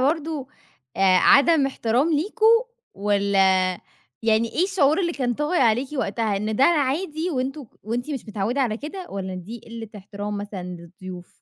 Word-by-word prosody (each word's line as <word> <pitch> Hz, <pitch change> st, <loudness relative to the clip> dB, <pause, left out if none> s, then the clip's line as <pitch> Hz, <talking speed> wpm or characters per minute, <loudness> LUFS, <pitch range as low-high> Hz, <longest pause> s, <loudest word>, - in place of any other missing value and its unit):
برضو 295 Hz, 0 st, -1 dB, 0.5 s
آآ 190 Hz, -1 st, +5 dB
عدم 285 Hz, -, +5 dB
احترام 265 Hz, +4 st, 0 dB
ليكوا، 440 Hz, +9 st, +3 dB, 0.3 s
والّا 200 Hz, 0 st, +1 dB, 0.8 s
يعني 225 Hz, +1 st, +2 dB
إيه 345 Hz, -, +2 dB
الشعور 330 Hz, -5 st, +2 dB
اللي 340 Hz, -2 st, 0 dB
كان 250 Hz, -5 st, -1 dB
طاغي 300 Hz, +6 st, 0 dB
عليكِ 245 Hz, +2 st, +2 dB
وقتها؟ 220 Hz, -3 st, -1 dB
إن 215 Hz, +2 st, -2 dB
ده 265 Hz, -, +5 dB
عادي 315 Hz, +2 st, +1 dB
وأنتم 270 Hz, 0 st, -3 dB, 0.2 s
وأنتِ 240 Hz, +6 st, -3 dB
مش 275 Hz, -4 st, -3 dB
متعودة 215 Hz, +5 st, -1 dB
على 230 Hz, -5 st, 0 dB
كده 330 Hz, -, -7 dB
والّا 190 Hz, -1 st, -4 dB
دي 205 Hz, +6 st, -8 dB
قِلة 230 Hz, -1 st, -8 dB
احترام 205 Hz, +1 st, -6 dB
مثلًا 205 Hz, -2 st, -6 dB
للضيوف؟ 180 Hz, +1 st, -9 dB
245 Hz, 150 wpm, -23 LUFS, 205-300 Hz, 0.8 s, آآ